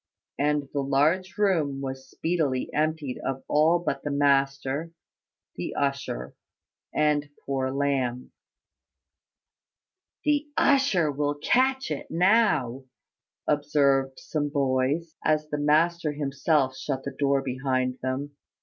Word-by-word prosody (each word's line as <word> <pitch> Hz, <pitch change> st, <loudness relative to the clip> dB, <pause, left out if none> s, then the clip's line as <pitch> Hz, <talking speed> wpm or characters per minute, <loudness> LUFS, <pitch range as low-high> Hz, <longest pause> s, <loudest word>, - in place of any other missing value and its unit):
And 145 Hz, 0 st, +1 dB
the 140 Hz, -, 0 dB
large 155 Hz, +8 st, +1 dB
room 165 Hz, -10 st, +1 dB
was 130 Hz, -1 st, -6 dB
speedily 155 Hz, -7 st, -1 dB
emptied 155 Hz, -3 st, -1 dB
of 135 Hz, 0 st, -3 dB
all 155 Hz, +3 st, +4 dB
but 150 Hz, -5 st, -3 dB
the 145 Hz, -, -3 dB
master, 140 Hz, +1 st, +1 dB, 0.7 s
the -, -, -4 dB
usher, 140 Hz, -, -2 dB, 0.6 s
and 150 Hz, -1 st, +1 dB, 0.2 s
poor 135 Hz, -1 st, -1 dB
Lamb. 130 Hz, -3 st, -1 dB, 1.9 s
"The 295 Hz, 0 st, +2 dB
usher 240 Hz, -, +3 dB
will 145 Hz, +1 st, -1 dB
catch 265 Hz, -, +1 dB
it -, -, -4 dB
now," 165 Hz, -, +2 dB, 0.6 s
observed 140 Hz, -2 st, +2 dB
some 145 Hz, -2 st, -2 dB
boys, 140 Hz, +3 st, 0 dB
as 155 Hz, 0 st, +1 dB
the 150 Hz, -, -2 dB
master 155 Hz, +2 st, +2 dB
himself 140 Hz, -1 st, 0 dB
shut 135 Hz, -1 st, -4 dB
the 140 Hz, -1 st, -6 dB
door 140 Hz, -1 st, +2 dB
behind 130 Hz, -1 st, -1 dB
them. 130 Hz, +3 st, -3 dB
145 Hz, 115 wpm, -26 LUFS, 135-155 Hz, 1.9 s, all